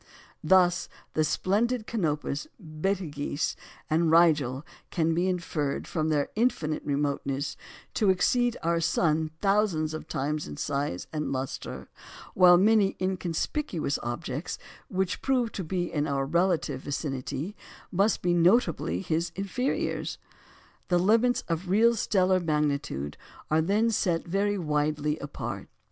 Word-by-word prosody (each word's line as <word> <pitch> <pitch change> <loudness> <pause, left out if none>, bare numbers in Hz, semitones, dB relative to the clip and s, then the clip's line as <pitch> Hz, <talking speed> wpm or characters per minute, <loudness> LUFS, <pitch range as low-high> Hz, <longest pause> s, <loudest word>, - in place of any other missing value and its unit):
Thus, 180 +1 +4 0.2
the 155 - +2
splendid 215 +8 +1
Canopus, 150 - -2
Betelgeux, 155 -3 -2 0.3
and 160 +1 +2
Rigel 150 -5 +4 0.2
can 165 -1 +1
be 175 +3 +1
inferred, 160 -6 -2
from 155 -1 -1
their 145 -2 +1
indefinite 185 -10 0
remoteness, 140 -1 -1 0.4
to 210 - +2
exceed 240 +6 +2
our 170 0 +2
sun 160 -1 +1
thousands 195 -6 +2
of 155 - -6
times 150 +3 -2
in - - -8
size 140 - -2
and 150 -1 -2
lustre; 130 0 -4 0.5
while 180 -1 +7
many 205 +1 +4
inconspicuous 185 - -1
objects, 125 +6 -4 0.3
which 190 -1 -1
prove 250 -4 +1
to 190 - -4
be 175 +1 -2
in 150 -1 0
our 135 -1 0
relative 170 -3 +1
vicinity, 140 +5 -4 0.4
must 200 +4 +2
be 175 0 +2
notably 180 +9 +3
his 170 -2 -1
inferiors. 200 +7 -2 0.7
The 175 - +3
limits 225 +7 +3
of 170 +2 -2
real 225 +5 +5
stellar 190 -3 +2
magnitude 150 - -1 0.3
are 155 +1 +4
then 210 +7 +2
set 175 -6 0
very 200 +3 0
widely 150 -2 0
apart. 140 0 -6
170 Hz, 125 wpm, -28 LUFS, 150-195 Hz, 0.7 s, while